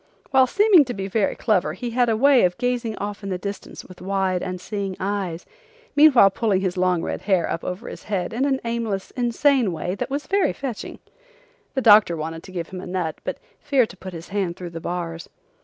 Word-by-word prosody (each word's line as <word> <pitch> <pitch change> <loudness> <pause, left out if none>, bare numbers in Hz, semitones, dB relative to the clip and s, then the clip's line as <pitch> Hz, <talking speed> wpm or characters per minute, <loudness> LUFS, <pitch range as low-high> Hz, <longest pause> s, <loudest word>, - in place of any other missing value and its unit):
While 265 -1 +5
seeming 400 - +5
to 245 - -5
be 195 0 -4
very 200 0 0
clever 185 -9 +1
he 235 +7 -5
had 245 0 +2
a 220 - +1
way 275 +1 +5
of 180 -1 +1
gazing 240 -3 -1
off 205 0 -5
in 200 - -5
the 185 - -1
distance 200 +2 -7
with 185 - -14
wide, 190 -1 0
unseeing 190 +1 -4
eyes, 190 -4 -3 0.5
meanwhile 285 -9 +7
pulling 200 -2 +1
his 185 -1 -1
long 180 -2 +1
red - - -3
hair 190 -4 +1
up 165 - -3
over 185 +6 -5
his - - -9
head 200 -3 -2
in 245 +4 0
an 270 -2 +1
aimless, 230 -4 -2
insane 245 -2 +2
way 170 +2 -3
that 200 - -4
was 285 +2 -3
very 395 0 +1
fetching. 260 -6 -6 0.8
The 265 - +1
doctor 210 -7 +6
wanted 160 +1 -5
to 185 - -13
give 170 -3 -5
him 185 -1 -7
a - - -8
nut, 180 -3 -3
but - - -3 0.2
feared 270 -6 +1
to 190 - -16
put 185 0 -9
his 165 0 -9
hand 190 -4 -1
through 175 -2 -7
the 165 -1 -7
bars. 170 -1 -5
200 Hz, 215 wpm, -23 LUFS, 180-240 Hz, 0.8 s, meanwhile